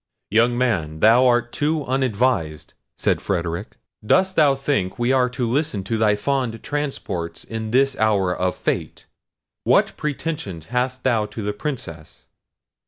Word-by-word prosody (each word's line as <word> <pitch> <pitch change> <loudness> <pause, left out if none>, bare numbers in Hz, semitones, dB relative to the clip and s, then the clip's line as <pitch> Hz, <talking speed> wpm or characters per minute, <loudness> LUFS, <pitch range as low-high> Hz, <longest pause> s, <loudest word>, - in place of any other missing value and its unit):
"Young 120 +3 +3
man, 90 -12 0
thou 120 +6 +6
art 120 -1 +2
too 150 0 -1
unadvised," 125 - 0 0.2
said - - +1
Frederic. 85 -3 -3 0.3
"Dost 185 - +2
thou 145 -4 +5
think 135 -9 -1
we 120 +1 +1
are 130 -1 +3
to 125 -1 -2
listen 130 -5 -1
to 105 +4 -2
thy 110 -1 +3
fond 125 0 -2
transports 105 - -4
in 110 -1 -5
this 135 +3 +3
hour 100 -4 +2
of 90 +1 -1
fate? - - -3 0.6
What - - +3
pretensions 140 - -4
hast 125 +1 -1
thou 115 -5 +2
to 110 - -7
the 105 0 -2
Princess?" 105 - -7
120 Hz, 145 wpm, -22 LUFS, 100-135 Hz, 0.6 s, thou